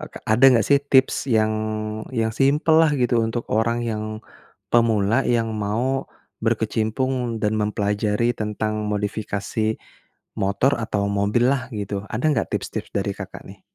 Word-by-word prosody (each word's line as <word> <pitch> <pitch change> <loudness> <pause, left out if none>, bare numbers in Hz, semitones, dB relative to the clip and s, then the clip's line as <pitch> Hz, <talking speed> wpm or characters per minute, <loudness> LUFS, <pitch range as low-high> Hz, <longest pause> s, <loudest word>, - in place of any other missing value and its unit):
e - - -3
Kak, - - -10
ada 110 +4 +4
nggak 115 -3 +3
sih 140 -1 +6
tips 130 -1 +4 0.2
yang 110 0 +2 0.6
yang 110 -2 0
simpel 150 +4 +3
lah 155 - +3
gitu 120 -2 +2
untuk 115 +1 -3
orang 115 +2 +1
yang 110 -2 -4 0.5
pemula 115 +1 +3
yang 115 -2 +1
mau 115 +6 -1 0.4
berkecimpung 120 +1 -1
dan 110 0 +1
mempelajari 105 +2 0
tentang 110 0 -2
modifikasi 105 +1 -2 0.6
motor 100 +8 +1
atau 105 -3 -1
mobil 100 +4 +1
lah 130 -2 -2
gitu. 100 -2 -4
Ada 115 +6 -3
nggak - - -1
tips-tips - - -4
dari - - -1
Kakak - - -8
nih? - - -13
110 Hz, 145 wpm, -22 LUFS, 105-120 Hz, 0.6 s, sih